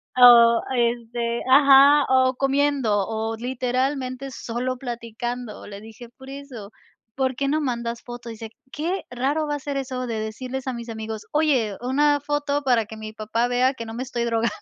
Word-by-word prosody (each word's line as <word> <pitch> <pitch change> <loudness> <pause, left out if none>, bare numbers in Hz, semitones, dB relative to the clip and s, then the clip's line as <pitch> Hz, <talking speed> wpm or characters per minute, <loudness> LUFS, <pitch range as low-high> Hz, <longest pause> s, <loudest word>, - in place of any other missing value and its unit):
O, 235 -2 +8
este 235 0 -1
ajá, 280 +1 +7
o 260 0 +3
comiendo, 270 -7 +1
o 225 0 -3
literalmente 255 +2 -2
solo 250 +2 -4
platicando". 240 -1 -6
Le 200 0 -9
dije: 225 +2 -12
“Por 265 +2 -14
eso, 270 -7 -9 0.4
¿por 260 -1 0
qué 275 +2 -1
no 305 +2 +1
mandas 235 -3 -3
foto?”. 240 -1 -9
Dice 225 -1 -8 0.2
qué 345 +6 -3
raro 280 +5 -1
va 295 - -1
a - - -5
ser 285 0 -5
eso 255 -1 -3
de 230 -3 -3
decirles 255 +5 -5
a 260 - -1
mis 235 0 -7
amigos: 220 -1 -6
"Oye, 270 -10 +1
una 290 +4 +2
foto 290 0 -1
para 245 -5 +2
que 220 - -10
mi 215 0 -8
papá 220 +2 -1
vea 250 +2 +2
que 230 -3 -8
no 225 - -7
me 245 - -3
estoy 240 -2 -3
drogando”. 230 -1 0
245 Hz, 175 wpm, -23 LUFS, 230-270 Hz, 0.4 s, O